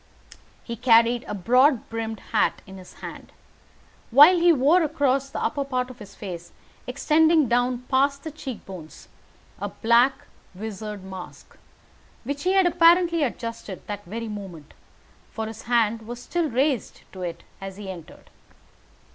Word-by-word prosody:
He 235 - -5
carried 235 0 +4
a 210 - -4
broad 250 - +3
brimmed 225 -1 -5
hat 220 - +1
in 190 0 -11
his 185 - -14
hand, - - -9 0.8
while 295 +9 +8
he 345 0 +6
wore 310 +5 +4
across 280 -3 +1
the - - -6
upper 285 - -1
part 255 -2 -2
of 250 - -15
his 200 -2 -12
face, 175 -4 -8 0.3
extending 310 +3 +3
down 245 +1 +1
past 280 +2 +1
the 315 - -5
cheek 275 -6 -8
bones, 175 -5 -11 0.5
a - - -3
black 240 +4 +2 0.3
visard 210 0 -6
mask, 190 -1 -10 0.7
which 285 +6 -5
he 370 - +3
had 385 -1 +4
apparently 340 -1 +4
adjusted 230 -7 -4
that 205 -1 -6
very 225 +5 -5
moment, 190 -8 -8 0.6
for 220 -1 -5
his 220 0 -8
hand 230 -2 +2
was 240 0 -6
still 330 +5 -2
raised 260 -1 -1
to 190 - -9
it 175 -2 -5 0.2
as 195 0 -7
he 205 -1 -8
entered. 175 -5 -10
240 Hz, 150 wpm, -24 LUFS, 210-280 Hz, 0.8 s, while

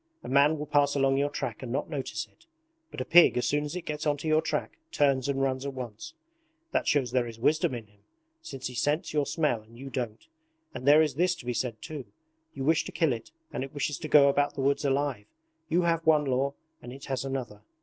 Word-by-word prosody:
A - - -8
man 140 +4 +4
will 150 - -4
pass 145 -1 +2
along 135 -1 +3
your 140 +1 +1
track - - -4
and 125 -3 -6
not 140 +4 -1
notice 145 -5 -4
it; 335 - -29 0.4
but - - -6
a - - -3
pig 175 -6 +6
as 125 - +1
soon 145 0 +1
as 150 +3 -5
it 180 - -4
gets 150 0 -4
onto 145 +1 -1
your 155 0 +4
track 165 - -3
turns 140 - +2
and 135 -1 0
runs 130 -1 -1
at 140 -1 -5
once: 125 - -7 0.6
that - - 0
shows 135 -5 +2
there 125 -1 +1
is 115 -1 -9
wisdom 150 +1 +2
in 115 -2 -7
him, 105 -1 -28 0.4
since 135 - -8
he 125 - -3
scents 150 +8 0
your 145 -2 +1
smell 150 -9 0
and 115 +2 -18
you 135 +2 -8
don't. 115 -3 -4 0.5
And 130 +1 -6
there 150 +2 +8
is 150 -3 -1
this 175 +5 +1
to 130 - -12
be 125 - -1
said 115 -2 -3
too: 155 -5 -6 0.5
you 135 - -4
wish 160 +3 +3
to - - -6
kill 160 -6 +2
it 115 -1 -7 0.2
and - - -2
it 135 +2 -9
wishes 145 0 -2
to 155 - -5
go 145 -2 +7
about 145 +1 +2
the 140 - -3
woods 140 +2 +1
alive. 140 -5 0 0.4
You 175 +2 +2
have 165 -1 +1
one 155 -2 +4
law 135 +1 0 0.3
and 120 - -9
it 135 +2 -10
has 135 -2 -2
another. 130 -6 -5
140 Hz, 240 wpm, -28 LUFS, 130-150 Hz, 0.6 s, there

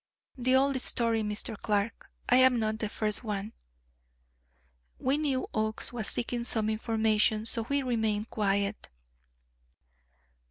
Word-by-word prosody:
The 255 0 +2
old 270 0 +2
story, 230 -3 +1
Mr. 210 +1 -3
Clark; 210 +1 -2 0.2
I 250 - +5
am 260 -1 +5
not 220 -1 -1
the 215 - -2
first 215 +1 0
one!" 210 -1 -4 1.4
We 265 +2 +1
knew 275 -4 0
Oakes 220 +2 -2
was 225 -4 -2
seeking 240 0 0
some 220 -2 0
information, 220 -1 +1
so 230 0 +2
we 280 0 +1
remained 220 -3 -1
quiet. 200 -1 -1
220 Hz, 125 wpm, -29 LUFS, 215-245 Hz, 1.4 s, I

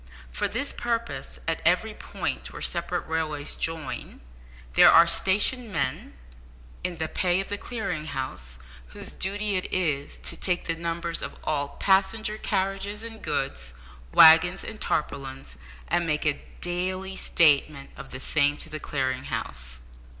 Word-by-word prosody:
For - - -1
this 260 +6 -1
purpose, 235 -1 -3
at - - 0
every - - +2
point - - -4
where - - -8
separate - - -1
railways 155 -2 -1
join, 165 -1 -4 0.5
there - - +8
are 165 - +8
stationed 205 +7 +3
men 130 -8 -2 0.7
in 175 -2 -2
the 160 0 -2
pay 180 +2 +1
of 195 - -4
the 205 - -2
Clearing 195 -10 -4
House, 130 - -5 0.3
whose 65 - -8
duty 205 +1 0
it 185 - -3
is 150 -6 -1
to - - -1
take 180 -2 0
the 165 - 0
numbers 170 0 -3
of - - -5
all 145 -2 -2
passenger 210 +3 +2
carriages 195 +2 -2
and 225 -1 -8
goods, 60 - -3 0.4
waggons 165 - +7
and 220 -1 -8
tarpaulins, 135 - -3 0.3
and 175 -1 +1
make 150 0 0
a 145 -1 +1 0.2
daily 185 +2 -2
statement 150 -6 +2
of 135 - -10
the 130 - -7
same 145 +1 +2
to - - -7
the 155 - -4
Clearing 130 -3 -2
House. - - -5
165 Hz, 150 wpm, -26 LUFS, 145-195 Hz, 0.7 s, there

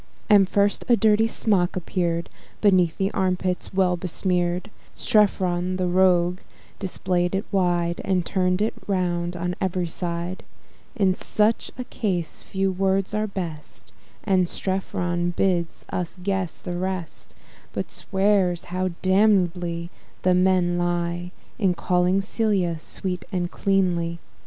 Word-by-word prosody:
And, 195 -2 +6
first, 205 0 +2
a 240 - +7
dirty 220 0 +4
smock 200 -6 +1
appear'd, 170 -1 -1 0.3
Beneath 185 -5 +3
the 195 +1 0
arm 185 -2 +1
pits 180 -1 -2
well 185 -2 +2
besmear'd; 180 +1 -1 0.2
Strephon, 185 -4 +2
the 185 0 -1
rogue, 180 0 +3 0.4
display'd 180 -1 -1
it 195 - -1
wide, 175 -3 +1
And 185 -3 +1
turn'd 185 +1 +1
it 220 - 0
round 175 -2 -1
on 180 +1 -2
ev'ry 185 -2 0
side: 170 +1 -3 0.6
On 190 -2 +4
such 215 +4 0
a 250 - -3
point, 190 -9 -1
few 190 +4 -2
words 195 +1 0
are 215 0 0
best, 155 - -7 0.3
And 185 -3 +2
Strephon 175 -2 -2
bids 175 -3 0
us 180 +1 -3
guess 190 -3 -2
the 175 -1 -4
rest; 185 -3 -4 0.4
But - - -4
swears, 190 -3 +1
how 185 0 0 0.2
damnably 180 -3 +2 0.3
the 185 - +4
men 180 -1 +3
lie 175 0 -1 0.3
In 190 -4 +2
calling 180 +2 +2
Celia 195 -5 0
sweet 180 +2 -4
and 175 -2 -1
cleanly. 175 -4 +1
185 Hz, 130 wpm, -24 LUFS, 175-195 Hz, 0.6 s, a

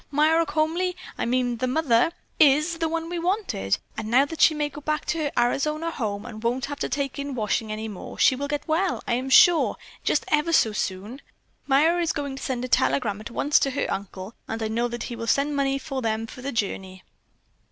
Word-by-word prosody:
Myra 315 +3 +3
Comely, 335 +4 0 0.2
I - - -2
mean 245 -1 0
the 255 - -1
mother, 255 0 +2 0.3
is 305 +4 +4
the 325 - 0
one 330 0 -2
we 345 0 -3
wanted. 340 - 0 0.2
And 215 - -5
now 255 +4 +5
that 320 +2 -6
she 315 - +6
may 300 -1 0
go 290 +1 -10
back 305 +1 -2
to 330 - -1
her 295 -2 -1
Arizona 300 +7 +1
home 205 -8 -3
and 215 -2 -8
won't 240 +2 0
have 285 0 -6
to - - -2
take 275 +1 -2
in 280 -1 -4
washing 215 -1 -1
any 215 +1 -4
more, 205 -4 -8
she 260 - +5
will 285 +2 -3
get 290 0 -3
well, 345 +4 0
I - - +1
am 255 +2 -1
sure, 340 +4 +6 0.3
just 300 - +1
ever 305 +2 +2
so 225 -8 +4
soon. 210 +5 -4 0.5
Myra 315 +6 +3
is 335 - 0
going 280 -2 -4
to - - -8
send 255 -1 -2
a - - -4
telegram 215 -5 +1
at 215 - -8
once 285 +5 +2
to 275 - +1
her 275 - -1
uncle, 195 +1 -5
and 225 0 -4
I 220 - -1
know 235 +2 0
that 240 -1 -5
he 240 - -5
will 230 0 -6
send 285 +5 +1
money 275 -1 +1
to 275 -2 -4
them 225 -1 -1
for 250 - -11
the 275 +2 -4
journey." 190 -4 -3
270 Hz, 225 wpm, -25 LUFS, 230-305 Hz, 0.5 s, she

